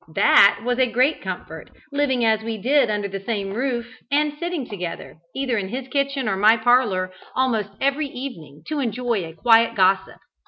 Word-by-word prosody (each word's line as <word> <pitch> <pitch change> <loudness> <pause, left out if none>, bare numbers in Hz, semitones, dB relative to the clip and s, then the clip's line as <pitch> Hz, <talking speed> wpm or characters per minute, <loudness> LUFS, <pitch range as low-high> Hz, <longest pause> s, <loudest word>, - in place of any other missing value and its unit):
That 200 0 +5
was 245 +1 -1
a 255 -2 +2
great 255 +6 +2
comfort, - - -7 0.2
living 275 -4 +1
as 220 -1 +2
we 225 0 -4
did 260 +3 +2
under 205 -1 -1
the 195 0 -6
same 195 -1 -3
roof, 240 0 -2 0.2
and 295 +1 +1
sitting 340 -7 -3
together, 180 -5 -7 0.2
either 260 -4 -1
in 190 -1 -5
his 255 +3 -5
kitchen 275 -2 -1
or 195 - 0
my 215 +3 +5
parlour, 220 -6 +2 0.2
almost 230 -6 0
every 280 +2 0
evening, 165 - -9
to 305 - -2
enjoy 240 -4 -1
a 165 -1 -8
quiet 230 +5 +4
gossip. 190 -1 +2
235 Hz, 180 wpm, -22 LUFS, 200-265 Hz, 0.2 s, That